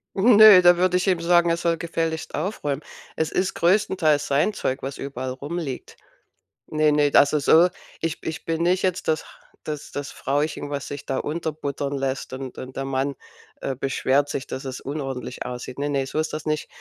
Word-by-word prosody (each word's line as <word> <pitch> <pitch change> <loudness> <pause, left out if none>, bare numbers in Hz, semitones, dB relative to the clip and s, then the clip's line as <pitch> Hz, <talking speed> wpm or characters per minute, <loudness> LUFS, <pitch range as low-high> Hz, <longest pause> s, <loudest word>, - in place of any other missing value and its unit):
Ne, 215 -2 +8
da 175 -1 +6
würde 180 0 +3
ich 180 - -1
eben 180 -3 +2
sagen, 175 0 +4
er 165 - +1
soll 170 0 0
gefälligst 165 -1 -3
aufräumen. 150 -4 -2 0.3
Es 160 0 -1
ist 185 +1 0
größtenteils 175 -5 +2
sein 145 +10 +2
Zeug, 135 -8 -3
was 135 +1 -5
überall 130 -2 -4
rumliegt. 145 +1 -6 0.7
Ne, 155 0 +2
ne, 145 -1 +3
also, 145 +2 +5
so 165 +5 +5 0.3
ich 165 -1 -3
ich 160 - -5
bin 165 0 -1
nicht 180 +2 +2
jetzt 185 -1 -1
das 155 -1 +1 0.4
das 150 -1 -6
das 145 0 -5
Frauchen 145 +1 -2
was 140 -2 -4
sich 140 -1 -7
da 135 - -2
unterbuttern 150 -3 -3
lässt 135 -1 -3
und 130 -1 -7
und 130 0 -8
der 135 - -3
Mann, 135 +1 -1 0.5
äh, 135 - -2
beschwert 135 +1 +1
sich, 135 -2 -4
dass 135 +2 -6
es 130 -1 -6
unordentlich 135 -3 -5
aussieht. 125 +1 -6
Ne, 145 +1 -1
ne, 140 -2 0
so 135 - -3
ist 155 0 -2
das 155 0 -5
nicht. 155 -1 -1
150 Hz, 190 wpm, -24 LUFS, 135-170 Hz, 0.7 s, Ne